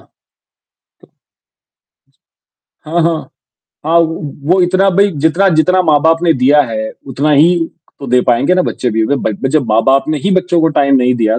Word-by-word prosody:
जी। - - -31 2.6
हाँ, 170 0 0
हाँ। 165 -1 -2 0.5
हाँ, 165 +2 +2
वो 165 -1 -1 0.3
वो 185 - +1
इतना 190 +2 +1
भई, 200 +2 +2
जितना 160 +5 0
जितना 180 +3 +2
माँ-बाप 160 0 +2
ने 170 -2 +3
दिया 140 +2 +2
है, 110 -3 -5 0.2
उतना 140 +4 -2
ही 165 +3 +2 0.3
तो 140 - -7
दे 125 0 +2
पाएँगे 125 +9 +2
ना 185 - +1
बच्चे 125 - -3
भी 110 0 -1
अगर 140 - 0
ब 125 +2 -3
जब 150 -1 0
माँ-बाप 135 +5 +2
ने 155 -1 -1
ही 195 +6 -2
बच्चों 180 -2 0
को 160 - +2
टाइम 140 -3 +1
नहीं 125 -1 +1
दिया, 115 -1 0
155 Hz, 175 wpm, -13 LUFS, 130-170 Hz, 2.6 s, ने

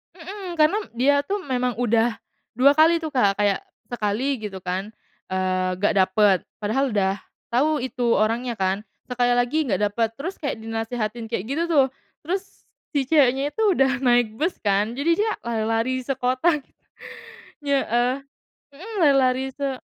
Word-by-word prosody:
Mhm, 370 +1 -7
karena 310 +7 +4 0.2
dia 270 +4 +3
tuh 400 +3 -2
memang 250 -4 -1
udah, 230 -1 +2 0.4
2 265 +4 +5
kali 330 +1 +5
tuh 315 - -3
Kak 210 -9 +2
kayak 205 -1 0 0.2
sekali 240 +4 -1
gitu 200 -4 -7
kan, 190 +4 -4 0.4
eee, 185 0 0
gak 205 - +3
dapet 190 +1 +4 0.2
padahal 240 +4 0
udah 195 -1 +1 0.3
tahu 290 +4 +1
itu 245 -2 0
orangnya 230 +3 0
kan, 190 +1 0 0.3
sekali 245 0 +2
lagi 280 +6 +1
nggak 195 -2 0
dapet 225 +1 0
terus 345 +7 -5
kayak 280 -6 -2
dinasehatin 225 0 -3
kayak 220 -4 -3
gitu 315 +5 0
tuh. 285 -5 +5 0.4
Terus, 380 +3 -1 0.5
si 280 -2 +1
ceweknya 280 -2 +3
itu 445 - -3
udah 270 -2 +2
naik 240 -3 +3
bus 335 +3 0
kan 205 +2 +1
jadi 285 +6 0
dia 435 +1 +1
lari-lari 225 +2 -1
sekota 265 +5 +1
gitu. - - -36 0.9
Heeh, 250 -3 +1 0.6
mhm, 425 +8 -9
lari-lari 265 -3 +3
se 275 -2 -3
245 Hz, 150 wpm, -23 LUFS, 215-280 Hz, 0.9 s, 2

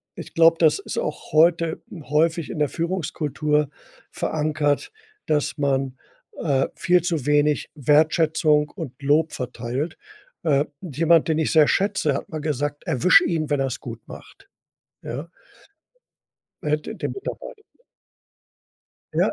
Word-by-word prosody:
ich - - -9
glaube, 165 0 +6
das 165 - +4
ist 400 - -6
auch - - -4
heute 165 +1 +3 0.2
häufig 160 +2 +1
in 155 - -5
der 145 -3 +2
Führungskultur 150 -4 -1 0.4
verankert, 150 - -1 0.3
dass 150 0 0
man, 135 -2 0 0.4
äh, 135 -4 +1
viel 180 0 +3
zu 165 -5 -2
wenig 150 0 +2
Wertschätzung 150 +1 +3
und 160 -10 -7
Lob 155 +3 +2
verteilt. 125 +5 -4 0.5
Äh, 145 -3 +3 0.2
jemand, 165 0 +2
den 160 -1 +1
ich 160 - 0
sehr 155 -2 +6
schätze, 195 -7 +1
hat 135 - -5
mal 155 - -5
gesagt: 145 -1 -2
„Erwisch 175 +8 +5
ihn, 155 -3 -1
wenn 145 -1 +1
er's 135 -2 -2
gut - - -7
macht“, - - -13 0.5
ja? 140 +7 -6 1.3
Er 150 - -3
hätte 155 +9 -2
dem - - -3
Mitarbeiter 435 +3 -7 1.5
Ja, - - +2
155 Hz, 130 wpm, -23 LUFS, 145-165 Hz, 1.5 s, glaube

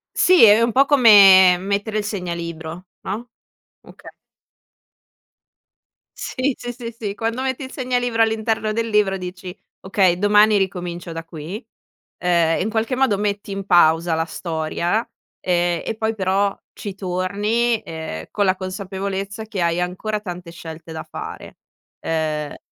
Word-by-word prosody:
Sì, 365 -7 +6
è 210 0 +7
un 230 0 +1
po' 270 +5 +5
come 200 -9 +7
mettere 200 +3 -2
il 210 - -2
segnalibro 170 -3 -5 0.2
no? 220 +5 -5 0.5
Okay. - - -14 2.1
Sì, 260 +1 -2
sì, 245 - -5
sì, 235 -1 -7
sì, 210 -4 -4
quando 230 +4 -2
metti 265 0 -2
il 260 - -9
segnalibro 245 -3 0
all'interno 220 -1 0
del 230 +1 -2
libro, 210 -3 +2
dici: 180 0 -8 0.2
"Okay, 190 -2 +2
domani 210 +2 +5
ricomincio 175 -3 -3
da 165 0 -6
qui." 165 - -8 0.5
Ehm, 170 -2 +2
in 215 - -2
qualche 225 +3 -1
modo 255 -7 +2
metti 205 -1 -2
in 195 -1 -5
pausa 170 -2 +4
la 160 0 0
storia, 170 +5 -2 0.3
ehm, 175 -1 0
e 225 - -3
poi 220 0 -1
però 195 0 0 0.2
ci 200 -2 -7
torni, 205 +5 -1
ehm, 160 - -7
con 205 - 0
la 190 -1 +2
consapevolezza 195 +2 -5
che 215 -3 -5
hai 170 +1 +1
ancora 185 +4 -3
tante 180 -3 -7
scelte 165 -1 -10
da 160 - -5
fare, - - -9 0.4
ehm 155 -2 -2
195 Hz, 145 wpm, -21 LUFS, 175-220 Hz, 2.1 s, è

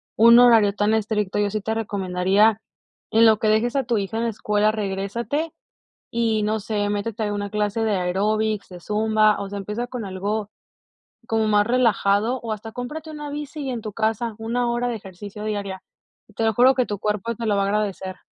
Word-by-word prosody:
un 235 +2 +7
horario 225 -5 +6
tan 210 +1 +1
estricto, 210 -2 0
yo 205 -1 +1
sí 215 +1 -2
te 220 +2 -2
recomendaría, 200 0 +1 0.5
en 225 +1 +5
lo 220 -1 +5
que 220 - 0
dejes 220 +4 +2
a 275 - +2
tu 235 -3 +1
hija 200 +2 -3
en 230 - 0
la - - +1
escuela, 210 0 +1
regrésate 215 +10 -3 0.6
y, 225 -2 +1
no 215 +1 0
sé, 205 0 -2
métete 210 +2 -2
a 205 0 -1
una 205 0 -3
clase 210 +1 -1
de 215 -2 +1
aeróbics, 205 +3 0
de 180 - -10
zumba, 215 +1 +2
o 200 - -4
sea, 205 - -5
empieza 210 +5 -4
con 245 -2 -5
algo 200 +2 -3 0.8
como 220 -1 +1
más 210 0 +3
relajado, 235 -1 +2
o 225 -2 -3
hasta 220 +1 -8
cómprate 300 +6 -6
una 295 -1 -7
bici 295 +1 -6
y 265 - -3
en 235 - -4
tu 215 - -6
casa, 220 +1 -1
1 235 +2 -1
hora 240 +1 -1
de 240 - -2
ejercicio 205 +1 -9
diaria. 200 -3 -4 0.5
Te 225 - -1
lo 220 - +2
juro, 255 +4 +5
que 255 -1 +2
tu 205 -2 -4
cuerpo 210 +2 -2
te 230 - -5
lo 210 - +2
va 200 - +2
a - - +1
agradecer. 200 -2 -2
215 Hz, 205 wpm, -23 LUFS, 205-230 Hz, 0.8 s, un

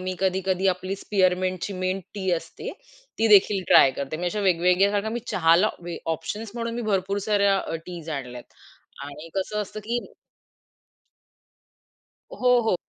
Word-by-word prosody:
मी 185 0 -3
कधी-कधी 190 0 0
आपली 185 +2 -5
स्पिअरमिंटची 185 -1 +1
minute 185 +1 -1
T 190 -2 -2
असते, 165 - -4 0.5
ती 225 0 +3
देखील 200 -1 +5
ट्राय 135 - +8
करते 140 +3 -4
मी 175 +2 -3
अशा 210 +4 -1
वेगवेगळ्या 180 +3 +3
सारख्या 205 +1 -1
मी 240 +1 -3
चहाला 170 +4 +4 0.5
ऑप्शन्स 205 +7 -6
म्हणून 230 -1 -3
मी 240 - -3
भरपूर 195 +1 0
साऱ्या 200 -2 +3 0.3
टीज 170 -3 -8
आणल्यात. 125 -2 -8 0.6
आणि 145 +3 -9
कसं 210 +2 -2
असतं 215 +1 -8
की 240 +2 -1 2.3
हो, 250 -1 +3
हो. 220 -4 +1
190 Hz, 140 wpm, -25 LUFS, 180-210 Hz, 2.3 s, ट्राय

